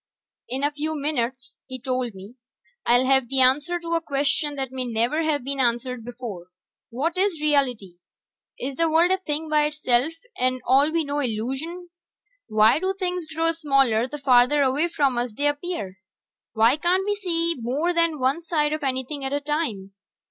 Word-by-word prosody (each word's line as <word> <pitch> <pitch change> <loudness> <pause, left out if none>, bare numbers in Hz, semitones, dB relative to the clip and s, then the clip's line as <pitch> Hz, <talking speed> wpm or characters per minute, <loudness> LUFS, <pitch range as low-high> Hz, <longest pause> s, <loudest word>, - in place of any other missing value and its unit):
"In 265 +2 -3
a 290 - +2
few 305 +2 -3
minutes," 260 -4 -2
he 260 -1 -7
told 255 -3 -2
me, 195 +4 -11 0.5
"I'll 245 +2 +4
have 265 -1 +3
the 270 - +1
answer 290 +7 +3
to 335 0 -4
a 335 - +1
question 290 0 0
that 265 -2 -4
may 260 -1 -3
never 240 +6 0
have 305 -4 0
been 275 +1 -3
answered 245 0 0
before: 235 -7 -7 0.4
what 280 +8 -2
is 380 -4 +1
reality? 250 -12 0 0.6
Is 265 +1 -5
the 330 -1 +2
world 330 +3 +4
a 380 - +2
thing 315 -3 -3
by 300 -1 +3
itself, 290 -1 0 0.2
and 255 0 0
all 275 +4 +4
we 325 0 0
know 290 0 -2
illusion? 270 +9 -3 0.6
Why 215 +5 +4
do 380 +2 -1
things 360 -3 -3
grow 325 +1 0
smaller 275 -8 +2
the 295 +3 -7
farther 270 +1 +4
away 275 +5 +1
from 280 -7 +1
us 240 -2 -3
they 285 +7 -2
appear? 290 - -3 0.5
Why 230 +5 +4
can't 360 +4 +1
we 415 - +1
see 335 -4 0
more 280 +9 -1
than 335 -2 +1
one 270 +5 0
side 305 -3 0
of 310 - -3
anything 270 +1 -3
at 270 +1 -3
a 285 - +1
time? 285 -10 -3
280 Hz, 180 wpm, -24 LUFS, 250-320 Hz, 0.6 s, I'll